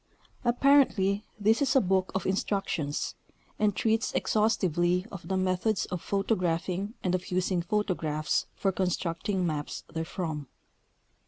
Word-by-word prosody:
Apparently 240 -6 +3
this 220 +5 +3
is 270 -1 +2
a - - +8
book 190 -3 +1
of 190 - -1
instructions, 190 -6 -1 0.5
and 210 -2 +2
treats 225 0 +1
exhaustivel}'" 180 -5 +2
of 190 -2 -8
the 190 - 0
methods 185 +3 +1
of 180 -2 -3
photographing 195 0 -1
and 180 - +1
of 185 0 -2
using 185 0 +1
photographs 170 -5 0
for 195 - +1
constructing 180 0 -1
maps 150 -3 -3
therefrom. 160 -3 -3
190 Hz, 120 wpm, -29 LUFS, 175-210 Hz, 0.5 s, a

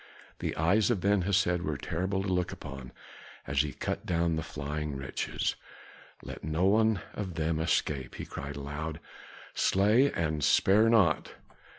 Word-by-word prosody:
The - - -2
eyes 100 +8 +3
of 120 -5 +1
Ben 100 +1 +2
Hesed 90 -2 +2
were 75 -4 -2
terrible 95 +6 -2
to - - -3
look 90 -1 0
upon 65 -2 -8 0.5
as 70 +1 +2
he 75 -1 -3
cut - - -4
down 85 -1 +1
the 80 - -1
flying 75 0 -4
wretches. 65 - -2 0.7
"Let - - -8
no 80 +4 0
one 110 -1 +3
of 95 -5 -5
them 80 0 0
escape!" 80 -4 -1
he - - -6
cried 70 0 -6
aloud. 75 +3 -5 0.5
"Slay 110 +8 +3
and 80 -3 -1
spare 105 +9 +5
not!" 100 -9 +3
85 Hz, 155 wpm, -30 LUFS, 75-100 Hz, 0.7 s, spare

